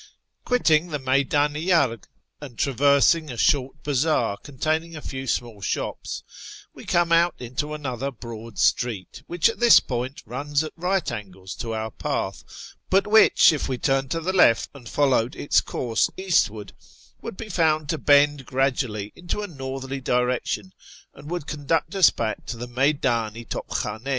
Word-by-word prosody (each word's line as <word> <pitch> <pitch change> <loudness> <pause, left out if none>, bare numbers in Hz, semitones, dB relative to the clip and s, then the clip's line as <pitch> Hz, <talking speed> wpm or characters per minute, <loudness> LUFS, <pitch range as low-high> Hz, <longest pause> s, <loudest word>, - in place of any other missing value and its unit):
Quitting 170 -10 +3
the 155 -3 -3
Mcyddn 140 +2 +1
i 165 +5 -1
Arg, 130 - +2 0.3
and 130 -6 -10
traversing 140 +4 +3
a 120 - -6
short 140 0 +1
bazaar 145 -6 +1
containing 155 +5 -3
a - - -6
few 135 -1 -6
small 115 -4 -3
shops, - - -4 0.5
we - - -12
come 170 -1 +1
out 170 +1 +4
into 130 +5 -4
another 135 -2 -4
broad 115 -3 -10
street, 115 -1 0
wliich 175 -2 +3
at 225 - -3
this 240 -2 +8
point 125 +2 -5
runs 140 +6 -2
at 155 - -6
right 180 -2 -1
angles 95 -4 -7
to 115 -2 -5
our 110 0 -4
path, - - -3 0.5
but 195 +1 +3
which, 215 -5 +6
if 145 - -3
we 130 - -1
turned 135 0 0
to 165 - -1
the 180 +3 -2
left 115 - +4
and 125 -6 -11
followed 130 -3 +1
its 145 - +2
course 115 -3 -1
eastwards, 110 - -2
would - - -7
be 225 - -7
found 160 -5 +1
to 160 -1 -2
bend 145 0 +4
gradually 125 -6 -1
into 175 +4 -4
a - - -4
northerly 135 -3 -6
direction, 125 +9 -1 0.4
and 145 +2 -12
would 175 -4 -4
conduct 150 +4 -1
us 190 -4 +6
back 110 -2 -3
to 120 - -5
the 120 +1 -6
3fcyddn 135 +5 0 0.3
i 120 - -7
To2}Midn4. 110 +1 -4
140 Hz, 165 wpm, -24 LUFS, 120-160 Hz, 0.5 s, this